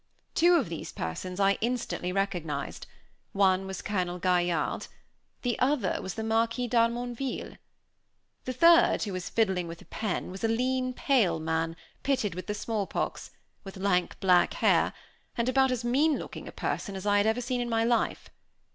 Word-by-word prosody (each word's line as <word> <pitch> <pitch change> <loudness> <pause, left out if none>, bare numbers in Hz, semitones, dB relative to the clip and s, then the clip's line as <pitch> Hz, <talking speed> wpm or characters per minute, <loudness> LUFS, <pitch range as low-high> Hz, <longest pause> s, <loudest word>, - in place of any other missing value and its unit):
Two 345 +2 +5
of 290 -10 +2
these 165 -1 -6
persons 180 - -5
I 195 0 +3
instantly 235 -6 -2
recognized; 180 -5 -3 0.5
one 190 -1 +3
was 190 -1 -6
Colonel 180 -3 -1
Gaillarde, 175 -3 0 0.6
the 245 -3 -1
other 255 -8 +1
was 190 - -5
the 220 - -3
Marquis 230 +2 +1
d'Harmonville. 240 +2 -1 0.9
The 255 - -2
third, 335 +6 +5
who 205 -3 -3
was 185 -1 -4
fiddling 190 -6 +1
with 165 0 -8
a - - -15
pen, 210 -4 -3
was 190 +3 -8
a - - +3
lean, 255 +3 0
pale 215 - +2
man, 160 +1 -1 0.3
pitted 255 -9 0
with 185 +2 -7
the 210 - -2
small 210 -2 -2
pox, - - -3 0.3
with 195 -2 -9
lank 185 -2 0
black 180 -2 +4
hair, - - +3 0.4
and 235 0 0
about 265 +1 +3
as 245 -2 -2
mean 280 +5 +3
looking - - -8
a - - -7
person 200 - -3
as 190 +1 -6
I 205 0 +3
had 205 +1 +3
ever 220 +2 +2
seen 245 0 -2
in 240 - -3
my 225 -1 +2
life. 235 0 0
210 Hz, 175 wpm, -28 LUFS, 185-245 Hz, 0.9 s, Two